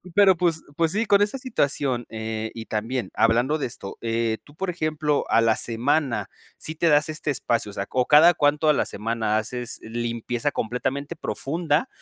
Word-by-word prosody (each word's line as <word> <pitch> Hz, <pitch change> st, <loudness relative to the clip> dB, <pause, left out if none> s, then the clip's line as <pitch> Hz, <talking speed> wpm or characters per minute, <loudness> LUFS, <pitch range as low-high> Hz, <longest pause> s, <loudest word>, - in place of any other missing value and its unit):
Pero, 200 Hz, -2 st, +6 dB
pues 170 Hz, -2 st, 0 dB
pues 165 Hz, -1 st, +2 dB
sí, 225 Hz, +3 st, +1 dB
con 200 Hz, 0 st, +4 dB
esa 210 Hz, +6 st, +1 dB
situación, 140 Hz, -, -1 dB
eh, 110 Hz, 0 st, -4 dB
y 115 Hz, -1 st, -6 dB
también 110 Hz, 0 st, -3 dB
hablando 120 Hz, +7 st, +2 dB
de 135 Hz, -, -1 dB
esto, 100 Hz, -4 st, -8 dB
eh, 115 Hz, -1 st, -1 dB
tú, 145 Hz, -, -19 dB
por 185 Hz, +1 st, -2 dB
ejemplo, 155 Hz, -3 st, -1 dB
a 115 Hz, -, +4 dB
la 115 Hz, -1 st, +3 dB
semana 120 Hz, -2 st, 0 dB, 0.3 s
sí 155 Hz, -, -5 dB
te 165 Hz, +1 st, +2 dB
das 150 Hz, +1 st, +4 dB
este 155 Hz, -1 st, -3 dB
espacio, 120 Hz, -5 st, -1 dB
o -, -, -14 dB
sea 100 Hz, -, -3 dB
O, 125 Hz, -1 st, +1 dB
¿cada 160 Hz, +4 st, +7 dB
cuánto 150 Hz, +1 st, +2 dB
a 150 Hz, -, +6 dB
la -, -, +1 dB
semana 110 Hz, 0 st, -1 dB
haces 120 Hz, +2 st, -3 dB
limpieza 120 Hz, +3 st, -2 dB
completamente 135 Hz, +5 st, -3 dB
profunda 160 Hz, -, -1 dB
135 Hz, 185 wpm, -24 LUFS, 115-155 Hz, 0.3 s, cada